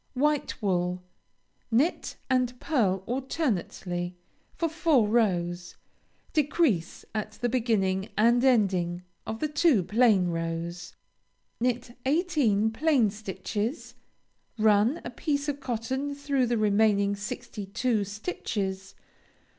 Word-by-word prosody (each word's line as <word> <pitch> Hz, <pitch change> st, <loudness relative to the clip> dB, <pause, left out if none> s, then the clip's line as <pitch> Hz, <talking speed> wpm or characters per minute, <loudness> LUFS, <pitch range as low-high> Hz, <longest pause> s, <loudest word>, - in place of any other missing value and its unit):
White 295 Hz, +2 st, 0 dB
wool 180 Hz, -2 st, 0 dB, 0.7 s
Knit 265 Hz, +10 st, +1 dB
and 255 Hz, -1 st, +1 dB
pearl 195 Hz, -, +1 dB
alternately 195 Hz, -, -2 dB, 0.4 s
for 335 Hz, -, 0 dB
four 315 Hz, -8 st, +2 dB
rows; 175 Hz, -6 st, 0 dB, 0.6 s
decrease 290 Hz, -, +1 dB
at 215 Hz, -1 st, -3 dB
the 240 Hz, +3 st, -2 dB
beginning 205 Hz, -6 st, 0 dB
and 235 Hz, +3 st, +4 dB
ending 185 Hz, -8 st, +2 dB, 0.2 s
of 220 Hz, -, -3 dB
the 305 Hz, -, 0 dB
two 300 Hz, -, +3 dB
plain 210 Hz, -3 st, +3 dB
rows. 170 Hz, +1 st, -4 dB, 0.6 s
Knit 240 Hz, 0 st, -1 dB
eighteen 275 Hz, -, +2 dB
plain 260 Hz, -4 st, +2 dB
stitches, 210 Hz, -, -4 dB, 0.6 s
run 220 Hz, +7 st, +3 dB
a -, -, -4 dB
piece 285 Hz, +3 st, -2 dB
of 285 Hz, -1 st, -2 dB
cotton 265 Hz, +3 st, -3 dB
through 280 Hz, -3 st, 0 dB
the 240 Hz, 0 st, +1 dB
remaining 205 Hz, -1 st, +3 dB
sixty 205 Hz, 0 st, -6 dB
two 225 Hz, +1 st, 0 dB
stitches. 200 Hz, -, -4 dB
220 Hz, 105 wpm, -27 LUFS, 195-265 Hz, 0.7 s, and